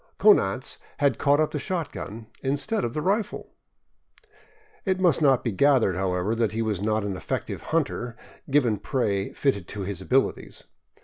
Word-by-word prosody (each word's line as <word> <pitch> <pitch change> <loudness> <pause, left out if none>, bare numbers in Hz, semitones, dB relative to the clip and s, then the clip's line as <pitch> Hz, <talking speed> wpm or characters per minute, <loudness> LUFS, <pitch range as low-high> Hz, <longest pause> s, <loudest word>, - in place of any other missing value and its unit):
Konanz 130 - +3 0.2
had 140 -5 +2
caught 145 0 +3
up 155 - +2
the 150 - -2
shotgun 140 - -4 0.2
instead 145 - 0
of 120 - -3
the 150 - -1
rifle! 200 +4 -1 1.3
It 190 -2 0
must 175 -5 +3
not 135 -4 +4
be 115 - 0
gathered, 125 -3 +3
however, 90 +2 0
that 115 -2 0
he 115 +1 -1
was 105 -4 -2
not 110 0 0
an 100 -2 -3
effective - - -4
hunter, 135 -7 -2 0.3
given 130 -6 +3
prey 100 -3 -1
fitted 100 -11 0
to 105 - -6
his 95 -1 -4
abilities. 130 +8 0
120 Hz, 160 wpm, -25 LUFS, 100-145 Hz, 1.3 s, not